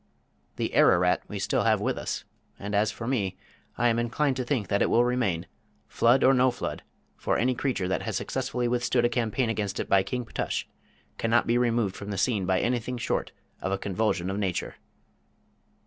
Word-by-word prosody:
The - - -2
Ararat 90 0 +4
we - - -5
still - - 0
have - - +3
with - - 0
us, - - -4 0.3
and 100 +1 -6
as 105 +1 +3
for 115 +2 -6
me, 105 -7 -1 0.4
I 120 - +3
am 115 0 +2
inclined 130 +4 0
to 130 - -1
think 120 -6 -1
that 100 - +1
it - - +3
will 120 - +4
remain, 110 -9 0 0.4
flood 120 +3 +3
or 135 - +6
no 130 0 +4
flood, 125 - -4 0.4
for - - 0
any 125 +2 +2
creature 125 -7 -1
that 95 - -1
has - - -3
successfully 125 0 -2
withstood 120 0 +1
a - - +3
campaign 120 +1 0
against 105 -3 -3
it - - -2
by 95 - +4
King 125 +5 -3
Ptush - - -2 0.6
cannot 115 +1 +2
be 120 - +1
removed 115 -5 +1
from 100 - -7
the 100 - -3
scene 100 -2 +1
by 95 -1 +2
anything 125 +1 -1
short 115 - -2 0.3
of 95 - -2
a 95 - +1
convulsion 95 -2 -1
of 100 - -3
Nature. 95 -4 -2
115 Hz, 195 wpm, -27 LUFS, 100-125 Hz, 0.6 s, or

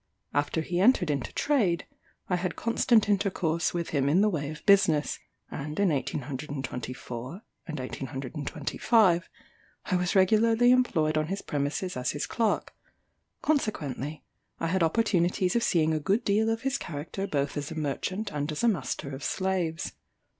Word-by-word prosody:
After 145 +3 0
he 175 +2 -2
entered 195 -6 +4
into 140 -4 -2
trade, 210 - +1 0.4
I 180 - +1
had 180 0 -2
constant 230 -1 +3
intercourse 185 -5 +1
with 170 -1 -3
him 140 -2 +1
in 175 +7 +4
the 210 0 +3
way 145 -5 -2
of 155 -1 -9
business; 190 -7 +4 0.3
and 150 +4 -5
in 200 -2 +4
1824 135 - -4 0.2
and 155 -3 -4
1825, 150 - 0 0.6
I 185 - 0
was 180 +1 0
regularly 225 +5 +5
employed 160 -12 +3
on 155 - -1
his 195 +3 -4
premises 145 +6 -2
as 125 0 -1
his 145 - -2
clerk; 225 -2 0 0.7
consequently, 155 - -1 0.4
I 165 - -1
had 190 +1 +1
opportunities 180 0 +2
of 235 - +3
seeing 160 -6 +2
a 155 - +1
good 195 +10 +1
deal 215 +2 +2
of 225 0 -1
his 270 0 -1
character 165 +6 -5
both 140 -5 -1
as 145 -1 -3
a 160 - -6
merchant, 160 +8 -2
and 145 +1 -2
as 150 - -3
a - - +5
master 145 - -1
of 135 +1 -7
slaves. 180 -4 -1
170 Hz, 155 wpm, -28 LUFS, 145-200 Hz, 0.7 s, regularly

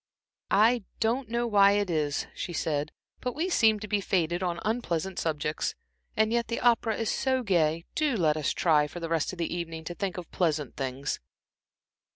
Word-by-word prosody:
"I 225 +3 +4 0.2
don't 235 +2 0
know 235 +1 0
why 200 -3 +5
it 205 0 +1
is," 150 -3 0
she 175 - -5
said, 150 -3 -1 0.3
"but 250 -1 -3
we 335 +5 -1
seem 220 - +4
to 210 - -5
be 205 -1 0
fated 175 -2 0
on 175 -2 -1
unpleasant 190 -6 -1
subjects. 155 -1 -1 0.4
And 220 +1 +3
yet 235 -1 +1
the 230 - -2
opera 230 -2 +2
is 225 - 0
so 260 -1 0
gay. 170 -5 +1
Do 295 -6 +1
let 155 -5 +3
us 155 -3 0
try, 150 -3 +3
for 175 - -8
the 165 -1 -4
rest 165 -2 0
of 185 - -9
the 170 0 -2
evening, 165 -2 -5
to 175 - -5
think 185 +1 -3
of 175 -2 -7
pleasant 155 -6 0
things." 135 0 -3
180 Hz, 190 wpm, -28 LUFS, 160-225 Hz, 0.4 s, why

